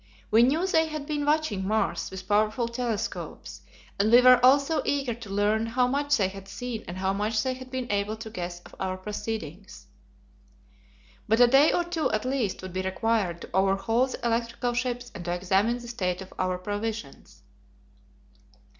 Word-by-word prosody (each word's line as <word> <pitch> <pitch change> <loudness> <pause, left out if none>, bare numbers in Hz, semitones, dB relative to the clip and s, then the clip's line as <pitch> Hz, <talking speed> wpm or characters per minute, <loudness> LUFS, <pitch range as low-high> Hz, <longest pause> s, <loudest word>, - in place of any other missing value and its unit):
We 225 - +6
knew 295 +9 +3
they 320 -4 +2
had 305 -2 -5
been 290 -1 -2
watching 295 -11 +1
Mars 220 +1 0
with 190 0 -9
powerful 215 +3 +2
telescopes, 235 -3 -4 0.4
and 210 +2 +3
we 240 - +9
were 250 0 +7
also 280 +5 +4
eager 275 -4 0
to 225 -2 -10
learn 210 +3 +1
how 250 +2 +2
much 285 +2 +1
they 195 -4 +2
had 195 0 -9
seen 240 +1 -5
and 175 - -6
how 190 +1 0
much 215 +2 0
they 260 - 0
had 255 0 -10
been 260 -1 -3
able 205 +1 0
to 220 0 -8
guess 175 -3 -5
of - - -16
our 185 -1 -2
proceedings. 205 -2 -6 1.4
But 225 +2 +3
a 245 - +9
day 270 +5 +5
or 350 - +1
two 340 -2 -1
at 215 +2 -1
least 255 -9 -1
would 185 -1 -7
be 185 - -1
required 190 -2 -1
to - - -9
overhaul 195 +6 +2
the 255 - -6
electrical 235 +1 -1
ships 245 0 -2
and 175 - -7
to 175 - -1
examine 195 +6 +1
the 240 -1 -10
state 185 -7 -2
of 190 - -15
our 185 -1 0
provisions. 210 +4 -6
225 Hz, 180 wpm, -27 LUFS, 195-255 Hz, 1.4 s, we